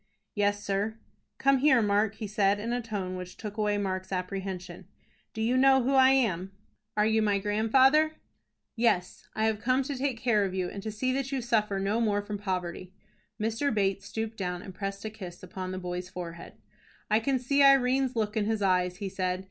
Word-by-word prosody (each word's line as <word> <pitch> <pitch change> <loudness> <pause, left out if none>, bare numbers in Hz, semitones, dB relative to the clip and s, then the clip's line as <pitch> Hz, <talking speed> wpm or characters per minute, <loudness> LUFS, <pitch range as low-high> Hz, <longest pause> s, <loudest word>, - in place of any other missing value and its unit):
"Yes, 205 0 0
sir." 205 +2 -1 0.4
"Come 275 0 +3
here, 265 -2 +5
Mark," 210 0 +2
he 215 - -5
said, 205 -1 +1
in 230 +3 -3
a 245 - -1
tone 200 -5 -4
which 180 0 -8
took 210 -2 -7
away 210 -1 +1
Mark's 185 -1 -3
apprehension. 185 -1 -5 0.4
"Do 220 - -3
you 240 +3 +2
know 265 0 +5
who 270 +3 +1
I 265 -1 +7
am?" 195 -8 +1 0.4
"Are 210 - +4
you 220 0 +3
my 205 -2 +2
grandfather?" 260 +10 +3 0.6
"Yes, 225 -7 0
I 220 - +1
have 220 -1 +1
come 255 +3 +2
to 280 +1 -4
take 265 -1 -1
care 220 -4 +2
of 190 -1 -2
you, 180 -1 -1
and 200 - -6
to 215 - -4
see 255 +5 -1
that 270 0 -2
you 270 - -1
suffer 215 -4 0
no 200 +4 0
more 205 -2 +1
from 205 0 -5
poverty." 185 -1 -4 0.4
Mr. 225 +6 0
Bates 195 -2 0
stooped 220 0 -4
down 180 -2 -3
and 190 - -9
pressed 195 +2 -5
a - - -2
kiss 185 -5 -10
upon 185 -1 -6
the 185 - -4
boy's 180 0 -5
forehead. 170 -2 -8 0.6
"I 215 - +5
can 265 +4 +1
see 280 +3 +1
Irene's 265 -1 +4
look 215 -1 -1
in 215 -2 +1
his 220 -1 -1
eyes," 180 -1 +1
he 200 - -4
said. 185 -1 -2
210 Hz, 205 wpm, -28 LUFS, 190-240 Hz, 0.6 s, I